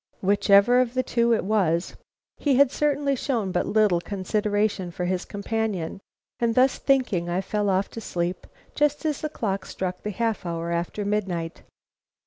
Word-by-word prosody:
Whichever 200 +4 +5
of 250 0 -2
the 255 - +2
two 235 -1 +1
it 225 - +2
was, 185 -5 +1 0.4
he 285 -3 +1
had 275 0 +5
certainly 285 -2 +1
shown 235 -7 -1
but 180 - 0
little 210 -5 +3
consideration 205 0 -1
for 175 +1 -4
his 185 0 -1
companion, 205 -4 -3 0.4
and 230 -1 +1
thus 255 +1 +3
thinking, 250 -11 +1
I 175 +1 0
fell 205 +1 -1
off 190 +1 +1
to 225 - -7
sleep 175 -2 -3 0.3
just 295 +1 +1
as 300 -2 -1
the 305 - -2
clock 195 -8 -2
struck 185 -1 -4
the 210 - -4
half 225 +1 -1
hour 170 -1 -3
after 170 +4 -2
midnight. 185 -5 -2
205 Hz, 165 wpm, -25 LUFS, 185-235 Hz, 0.4 s, Whichever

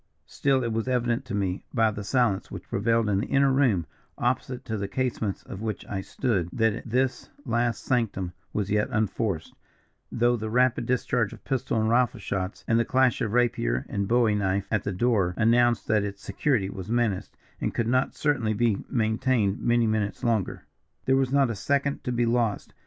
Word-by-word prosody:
Still 135 -2 +1
it 115 -2 -1
was 115 +2 -2
evident 120 -2 0
to - - -4
me, 95 -2 -1
by 110 -2 +3
the 105 0 -6
silence 105 -2 +1
which - - -8
prevailed 115 +1 +1
in 100 -2 +2
the - - -2
inner 140 0 +3
room 125 - +2 0.3
opposite 125 0 -1
to 110 - -3
the 100 -2 -3
casements 115 -5 -2
of 95 - -8
which 110 -1 -4
I 95 -2 -4
stood 95 -5 -1
that 110 0 0
this 130 +2 0 0.2
last 120 -2 0
sanctum 100 -8 -1 0.2
was 105 -2 -2
yet 105 0 +2
unforced, 105 -5 -1 0.6
though 120 +1 +2
the 110 -1 -4
rapid 125 +2 +2
discharge 125 -3 0
of - - -13
pistol 130 -4 -1
and 110 - +1
rifle 120 +1 +2
shots, 95 -1 -4
and 115 0 +3
the - - +3
clash 130 0 +2
of 110 -2 -1
rapier 65 - +1
and 100 -1 -2
bowie 115 -1 +3
knife 100 -1 0
at 110 -3 +1
the 100 - -2
door, 95 -3 +1
announced 120 +1 +3
that 105 -2 +2
its 100 -1 -6
security 105 0 0
was 95 +1 -7
menaced, 115 -5 -1 0.2
and - - -2
could 115 - 0
not 130 +2 +1
certainly 130 -7 +1
be 115 -3 +1
maintained 110 -2 +1
many 120 0 +3
minutes 110 -2 -1
longer. 115 -5 -1 0.4
"There 130 - +3
was 135 -1 +1
not 135 -3 +3
a - - -4
second 140 +6 -1
to 125 - -1
be 120 0 +1
lost. 115 -3 0
115 Hz, 190 wpm, -26 LUFS, 100-125 Hz, 0.6 s, by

